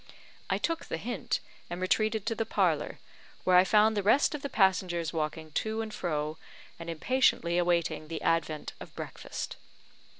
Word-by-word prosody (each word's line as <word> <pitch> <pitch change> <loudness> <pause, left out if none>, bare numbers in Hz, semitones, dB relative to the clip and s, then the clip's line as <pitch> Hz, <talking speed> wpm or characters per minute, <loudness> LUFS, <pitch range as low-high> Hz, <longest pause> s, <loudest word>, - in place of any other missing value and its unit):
I - - +2
took 330 -1 -1
the - - -3
hint, 230 +4 -2 0.3
and 175 - -4
retreated 215 +3 +1
to 230 - +1
the 225 - -1
parlour, 180 -9 +1 0.5
where 185 - +4
I 180 - +8
found 215 +3 +4
the 205 - +1
rest 260 +10 +4
of 300 - -4
the 280 - -4
passengers 180 -5 +2
walking 155 0 -3
to 220 +7 -1
and 215 -1 -7
fro, 155 -3 -2 0.4
and 165 0 -6
impatiently 170 -2 +2
awaiting 170 -3 +1
the 165 0 -5
advent 160 -2 0
of - - -11
breakfast. - - -6
180 Hz, 165 wpm, -30 LUFS, 165-220 Hz, 0.5 s, I